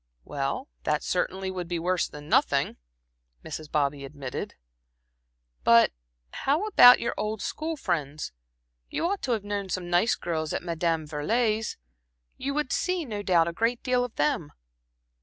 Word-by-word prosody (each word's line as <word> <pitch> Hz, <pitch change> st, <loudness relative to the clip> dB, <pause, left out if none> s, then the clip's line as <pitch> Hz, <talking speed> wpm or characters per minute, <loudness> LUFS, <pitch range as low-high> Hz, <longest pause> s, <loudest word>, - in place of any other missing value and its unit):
"Well, 140 Hz, -, -3 dB
that 150 Hz, 0 st, 0 dB
certainly 190 Hz, +1 st, -1 dB
would 180 Hz, -2 st, -4 dB
be 175 Hz, 0 st, -2 dB
worse 180 Hz, +2 st, 0 dB
than 150 Hz, 0 st, -11 dB
nothing," -, -, +2 dB, 0.7 s
Mrs. 155 Hz, -1 st, -7 dB
Bobby 140 Hz, -1 st, 0 dB
admitted. 135 Hz, -2 st, -6 dB, 1.1 s
"But 115 Hz, -, +6 dB, 0.4 s
how 300 Hz, +9 st, +1 dB
about 250 Hz, -12 st, +8 dB
your 235 Hz, -, -1 dB
old 215 Hz, 0 st, -2 dB
school 320 Hz, +1 st, -3 dB
friends? 150 Hz, -, -2 dB, 0.6 s
You -, -, -2 dB
must 380 Hz, -2 st, -1 dB
have 230 Hz, -5 st, 0 dB
known 205 Hz, -1 st, -3 dB
some 180 Hz, -1 st, -3 dB
nice 180 Hz, +7 st, +3 dB
girls 160 Hz, -2 st, -3 dB
at -, -, -2 dB
Madame 165 Hz, -2 st, -1 dB
Veuillet's. 215 Hz, +9 st, 0 dB, 0.6 s
You 280 Hz, +1 st, -3 dB
would 300 Hz, -4 st, -1 dB
see, 365 Hz, -2 st, 0 dB
no 210 Hz, -5 st, -4 dB
doubt, 175 Hz, -4 st, +3 dB
a 170 Hz, -, -2 dB
great 230 Hz, +6 st, 0 dB
deal 250 Hz, -1 st, +2 dB
of 245 Hz, -2 st, -6 dB
them." 150 Hz, +1 st, 0 dB
185 Hz, 150 wpm, -27 LUFS, 155-245 Hz, 1.1 s, about